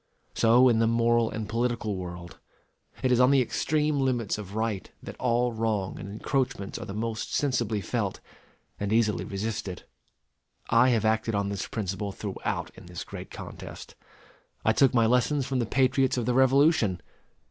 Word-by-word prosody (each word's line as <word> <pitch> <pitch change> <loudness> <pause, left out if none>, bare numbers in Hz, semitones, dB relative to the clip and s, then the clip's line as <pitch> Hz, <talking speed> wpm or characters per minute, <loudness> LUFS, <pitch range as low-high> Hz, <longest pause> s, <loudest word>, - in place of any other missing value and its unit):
So 120 +3 +5
in 115 -3 +3
the 115 - +3
moral 115 0 +3
and 110 -1 -5
political 115 -2 -1
world. 85 -1 -8 0.6
It 130 - +2
is 125 - +4
on 125 0 +6
the 140 -1 +5
extreme 150 +4 0
limits 125 -6 0
of 100 0 -8
right 110 -3 -2
that - - -8
all 125 0 +1
wrong 110 -4 -2
and 100 - -7
encroachments 110 -1 -2
are - - -7
the 100 - -6
most 110 0 -3
sensibly 120 -7 0
felt 90 - -2 0.6
and 100 0 -2
easily 110 -2 +2
resisted. 100 -2 -4 0.9
I 130 - +5
have 115 -3 +2
acted 110 0 +1
on 100 0 0
this 100 -2 -3
principle 100 -1 -3
throughout 100 0 -4
in - - -14
this 90 -1 -6
great - - -9
contest. - - -9 0.7
I - - +4
took 135 -2 +4
my 115 -1 +5
lessons 125 +4 +2
from 130 -1 -1
the 120 - -1
patriots 130 +1 +2
of 120 - -1
the 125 - +1
Revolution. 130 - +4
115 Hz, 170 wpm, -27 LUFS, 105-125 Hz, 0.9 s, on